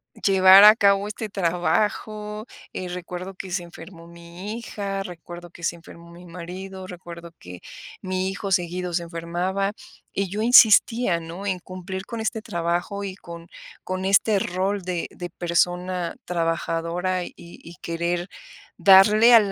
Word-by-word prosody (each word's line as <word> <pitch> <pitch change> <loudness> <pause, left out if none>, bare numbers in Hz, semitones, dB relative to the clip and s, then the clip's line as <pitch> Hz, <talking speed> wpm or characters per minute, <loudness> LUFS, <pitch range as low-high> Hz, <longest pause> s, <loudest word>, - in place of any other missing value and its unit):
eh, - - -17
llevar 190 0 +8
a 210 +1 +10
cabo 200 -1 +3
este 215 0 -6
trabajo, 210 +4 -1 0.3
eh, 185 - -5
recuerdo 180 +1 -7
que 190 -1 -8
se 180 0 -1
enfermó 170 0 -12
mi 170 +5 -8
hija, 200 -4 -4
recuerdo 175 -1 -10
que 170 - -15
se 170 - -1
enfermó 170 0 -14
mi 175 +1 -14
marido, 185 +2 -8
recuerdo 170 -2 -10
que 90 0 -11 0.4
mi 185 0 -2
hijo 195 0 -5
seguido 180 -1 -1
se 170 - 0
enfermaba, 175 +4 -2 0.4
y 195 0 -1
yo 210 +3 -3
insistía, 225 -4 +5
¿no?, 170 +4 -8
en 185 -2 -1
cumplir 185 +1 -7
con 230 -2 -6
este 220 0 -2
trabajo 175 +3 -2
y 190 -2 -5
con 170 -3 -11 0.4
con 185 0 -4
este 200 +1 +3
rol 190 +2 -1
de 180 -1 -3
de 175 -1 -7
persona 175 +1 -1
trabajadora 170 +1 -1
y - - -9
y 170 0 -13
querer 170 +1 -2 0.5
darle 210 +5 +7
al 210 -3 +5
185 Hz, 150 wpm, -23 LUFS, 170-195 Hz, 0.5 s, a